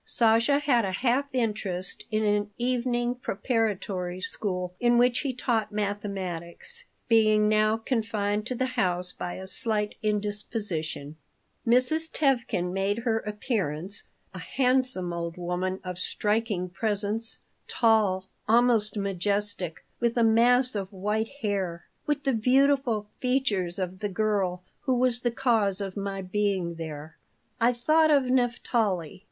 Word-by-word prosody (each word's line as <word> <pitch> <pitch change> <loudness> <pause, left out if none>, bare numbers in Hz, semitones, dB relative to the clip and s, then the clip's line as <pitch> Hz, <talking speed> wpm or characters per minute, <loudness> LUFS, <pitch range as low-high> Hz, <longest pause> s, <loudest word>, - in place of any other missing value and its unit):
Sasha 230 +4 +3
had 280 -5 +2
a 190 -1 -2
half 255 +6 +1
interest 210 -7 -2
in 215 -1 0
an 205 0 +1
evening 245 0 0
preparatory 200 -6 -2
school 180 -2 -3
in 240 0 +3
which 245 0 +4
he 280 - -1
taught 225 -4 -1
mathematics, 200 - -4 0.2
being 215 -2 +4
now 215 +1 +3
confined 215 -3 -1
to 255 - -1
the 255 - 0
house 180 -8 -1
by 175 - -5
a 190 - -7
slight 210 +1 -1
indisposition 205 -8 -2 0.5
Mrs. 255 +7 +3
Tevkin 235 - 0
made 195 +2 0
her 230 -1 0
appearance 200 - -1 0.3
a 185 - -7
handsome 255 -5 +1
old 170 0 -4
woman 180 +2 -2
of 180 -1 -6
striking 210 -2 0
presence, 210 +3 0 0.3
tall, 210 -5 +2 0.2
almost 225 -3 +3
majestic, 200 -2 -2
with 235 0 0
a 235 - +4
mass 245 +3 +4
of 195 -2 -4
white 210 +3 -1
hair, 190 -5 -2 0.2
with 295 -1 0
the 270 - +1
beautiful 250 -2 +2
features 235 -9 0
of 185 -1 -4
the 205 - -2
girl 190 -3 0 0.2
who 260 -2 0
was 245 -1 +2
the 240 - +1
cause 225 -6 +1
of 195 -2 -4
my 195 -1 -4
being 190 -2 -1
there. 160 -2 -7 0.4
I 235 +2 +4
thought 310 +6 +3
of 285 -3 +5
Naphtali. 235 - 0
210 Hz, 135 wpm, -27 LUFS, 190-240 Hz, 0.5 s, of